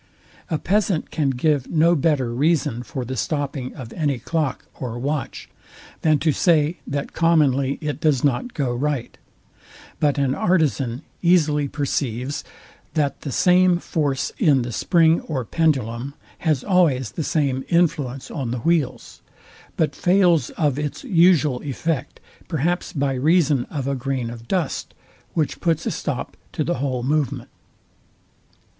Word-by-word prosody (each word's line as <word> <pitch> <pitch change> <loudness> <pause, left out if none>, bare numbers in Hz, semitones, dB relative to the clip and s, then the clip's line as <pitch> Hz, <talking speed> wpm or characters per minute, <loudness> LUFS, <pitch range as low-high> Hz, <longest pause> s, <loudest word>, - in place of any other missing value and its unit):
A 160 - 0
peasant 195 -1 0
can 150 -4 +1
give 135 +1 0
no 165 +1 +4
better 140 -6 +1
reason 140 -3 +1
for 130 0 -5
the 130 +2 -4
stopping 140 -3 -3
of 125 -4 -8
any 145 -6 0
clock 150 +2 -2
or 120 -2 -4
watch 140 +2 -3 0.5
than 155 -2 +4
to 155 +2 +1
say, 160 +1 +2
that 140 0 -3
commonly 140 -5 +2
it 150 -1 -3
does 150 -6 +2
not 145 - 0
go 135 -5 0
right: 140 0 -2 0.8
But 145 -1 +2
an 135 -2 +1
artizan 145 -8 +1 0.2
easily 155 -5 +3
perceives, 135 -2 -2 0.5
that 145 -3 0
the 140 - -5
same 180 +3 +4
force 145 -6 -1
in 145 - +4
the 120 - -5
spring 165 - +3
or 135 -6 -3
pendulum 135 -4 0 0.2
has 155 -6 0
always 160 - +2
the 160 - -3
same 140 -4 0
influence 150 -7 0
on 135 -6 -3
the 120 0 -3
wheels; 155 -5 -1 0.6
but 150 -3 +1
fails 175 -7 +3
of 145 -3 +1
its 150 -1 -4
usual 170 - +3
effect, 145 0 -3 0.3
perhaps 175 +3 -1
by 140 -2 0
reason 145 -1 +2
of 140 -4 -4
a 140 - 0
grain 130 -2 -2
of 115 -1 -10
dust, 180 -7 -2 0.4
which 155 -3 0
puts 165 -2 0
a - - 0
stop - - -4 0.2
to - - -1
the - - -2
whole 130 -3 -1
movement. 145 -1 -1
145 Hz, 145 wpm, -22 LUFS, 130-165 Hz, 0.8 s, no